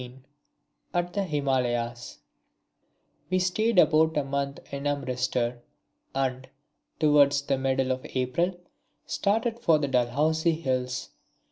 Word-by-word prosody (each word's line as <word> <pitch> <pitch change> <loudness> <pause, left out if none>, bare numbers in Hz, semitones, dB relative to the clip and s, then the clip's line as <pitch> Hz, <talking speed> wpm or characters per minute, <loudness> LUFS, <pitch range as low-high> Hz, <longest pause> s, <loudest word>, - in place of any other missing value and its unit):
(15) 125 +1 -11 0.7
At 175 0 0
the 200 - 0
Himalayas 125 -6 -1 1.1
We 185 - +2
stayed 190 +4 +1
about 160 -2 +4
a 145 - +2
month 140 0 -3
in 140 +1 -3
Amritsar, 125 -3 -1 0.6
and, 130 -1 -2 0.5
towards 145 -2 +4
the 135 -1 0
middle 130 0 +1
of 130 0 -2
April, 130 +9 0 0.5
started 225 +3 0
for 165 -9 +4
the 145 -2 -1
Dalhousie 150 +6 +1
Hills. 130 -3 -2
140 Hz, 115 wpm, -27 LUFS, 130-160 Hz, 1.1 s, about